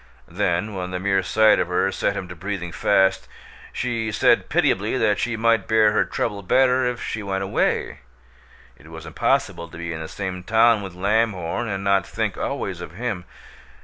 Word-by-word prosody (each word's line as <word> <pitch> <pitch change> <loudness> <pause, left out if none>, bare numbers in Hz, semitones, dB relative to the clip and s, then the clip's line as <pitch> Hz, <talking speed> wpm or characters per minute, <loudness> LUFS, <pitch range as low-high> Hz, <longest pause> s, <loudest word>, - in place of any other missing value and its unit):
Then, 90 +5 -1
when 90 -2 -4
the 90 0 -4
mere 95 0 +1
sight 110 +4 +4
of - - 0
her 90 +2 +1
set - - -1
him 95 - -5
to 90 - -9
breathing 95 -1 -5
fast, 95 +2 +2 0.4
she 115 -3 -2
said - - +3
pitiably 105 +6 +1
that 105 -4 +1
she 115 -1 -1
might 115 -2 +2
bear 110 -1 +4
her 105 - +2
trouble 100 -1 -3
better 130 +5 +3
if 125 0 -3
she 110 - -4
went 95 -1 -2
away; 95 - -1 0.8
it 75 - -17
was 80 0 -10
impossible 85 +1 -1
to - - -11
be 85 0 -5
in 80 - -6
the 80 - -6
same 95 -1 -5
town 110 +3 +3
with 95 -3 -8
Lamhorn 105 +1 0
and 95 -2 -3
not 100 -1 +2
think - - -2
always - - -4
of 80 - -8
him. 105 -5 -4
100 Hz, 185 wpm, -22 LUFS, 90-110 Hz, 0.8 s, sight